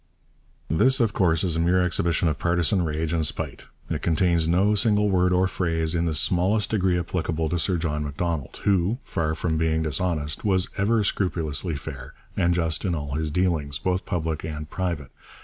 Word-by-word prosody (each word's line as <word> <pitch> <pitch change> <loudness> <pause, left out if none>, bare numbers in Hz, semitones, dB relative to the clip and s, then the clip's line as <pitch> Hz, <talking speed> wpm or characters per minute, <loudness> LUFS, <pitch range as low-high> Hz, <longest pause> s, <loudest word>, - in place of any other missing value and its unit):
This 130 - +3
of 115 -4 +2
course 85 -3 +2
is 85 -4 0
a - - 0
mere 90 +2 +3
exhibition 85 -1 +1
of 75 -3 -1
partisan 85 +2 +2
rage 80 0 -2
and 80 -1 +1
spite. 75 - -3 0.2
It - - -3
contains 85 0 +2
no 95 +5 +3
single 105 -1 +2
word 90 -1 +3
or 90 +1 +3
phrase 80 -3 -1
in 85 0 0
the 80 -2 0
smallest 95 +6 +1
degree 95 -4 +2
applicable 80 -2 -2
to 90 - -1
Sir 90 +2 +1
John 75 -2 -2
Macdonald, 75 0 -3
who, 100 +3 +2
far 80 -1 -2
from 80 -1 -1
being 80 0 +1
dishonest, 75 -1 -1
was 95 -3 +1
ever 105 +2 +2
scrupulously 85 -4 -1
fair 70 - -8 0.2
and 85 0 +2
just 80 -2 0
in 90 -3 0
all 70 -2 -4
his 80 +1 -1
dealings, 75 -4 0
both 90 +3 -2
public 80 -3 -2
and 75 -1 -6
private. 85 -7 -3
85 Hz, 185 wpm, -25 LUFS, 80-90 Hz, 0.2 s, This